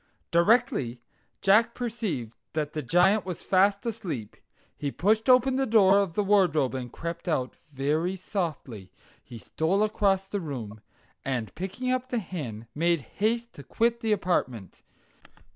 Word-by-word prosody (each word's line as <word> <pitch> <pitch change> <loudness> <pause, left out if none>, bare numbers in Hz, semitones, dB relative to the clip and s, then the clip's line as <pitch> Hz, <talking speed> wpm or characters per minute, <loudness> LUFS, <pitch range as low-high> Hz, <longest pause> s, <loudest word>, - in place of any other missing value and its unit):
Directly 170 - +2 0.4
Jack 215 +4 +4
perceived 215 - -4 0.2
that 150 -1 -2
the 155 - -2
Giant 180 - +3
was 180 -2 -6
fast 200 +2 +2
asleep, 185 - -5 0.4
he 145 - -3
pushed 220 - +1
open 255 +1 +5
the 270 0 +1
door 200 -3 +5
of 190 -5 -1
the 210 - +1
wardrobe 180 -10 +3
and 125 -2 -5
crept 170 +4 -6
out; 130 -7 -1 0.2
very 150 +7 0
softly 155 - -5 0.3
he 120 - -10
stole 165 - 0
across 195 -2 +1
the 200 0 -3
room, 115 -9 -6 0.4
and, 125 -5 -3
picking 215 +8 -3
up 255 0 -1
the 245 - -1
hen, 145 - -5
made 170 +1 +1
haste 230 - -2
to 140 - -11
quit 235 +7 0
the 225 -2 -1
apartment. 155 - -1
185 Hz, 145 wpm, -27 LUFS, 140-215 Hz, 0.4 s, open